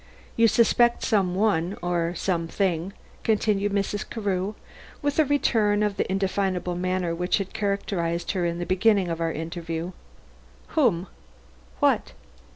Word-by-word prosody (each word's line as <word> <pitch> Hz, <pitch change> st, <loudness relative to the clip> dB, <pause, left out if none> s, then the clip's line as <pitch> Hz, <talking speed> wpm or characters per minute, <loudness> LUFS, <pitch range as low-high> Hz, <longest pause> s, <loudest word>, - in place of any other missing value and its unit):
"You 230 Hz, 0 st, +5 dB
suspect 235 Hz, +2 st, +3 dB
some 195 Hz, -6 st, +1 dB
one 190 Hz, -3 st, +1 dB
or 175 Hz, -1 st, 0 dB
something," 175 Hz, 0 st, -1 dB, 0.3 s
continued 205 Hz, -2 st, +1 dB
Mrs. 200 Hz, +1 st, -1 dB
Carew, 200 Hz, -2 st, -2 dB, 0.5 s
with 290 Hz, +1 st, 0 dB
a 310 Hz, -, +6 dB
return 220 Hz, -7 st, +2 dB
of 210 Hz, -1 st, -1 dB
the -, -, -1 dB
indefinable 190 Hz, -2 st, 0 dB
manner 180 Hz, -1 st, -1 dB
which 180 Hz, +2 st, +1 dB
had 195 Hz, -2 st, -4 dB
characterized 175 Hz, -4 st, -1 dB
her 185 Hz, -3 st, -1 dB
in 170 Hz, 0 st, -1 dB
the 175 Hz, -, -3 dB
beginning 190 Hz, 0 st, +3 dB
of 165 Hz, 0 st, -3 dB
our 165 Hz, 0 st, +1 dB
interview. 165 Hz, +1 st, -4 dB, 0.8 s
"Whom? 220 Hz, -, +2 dB, 0.8 s
What?" -, -, +2 dB
190 Hz, 135 wpm, -25 LUFS, 175-210 Hz, 0.8 s, a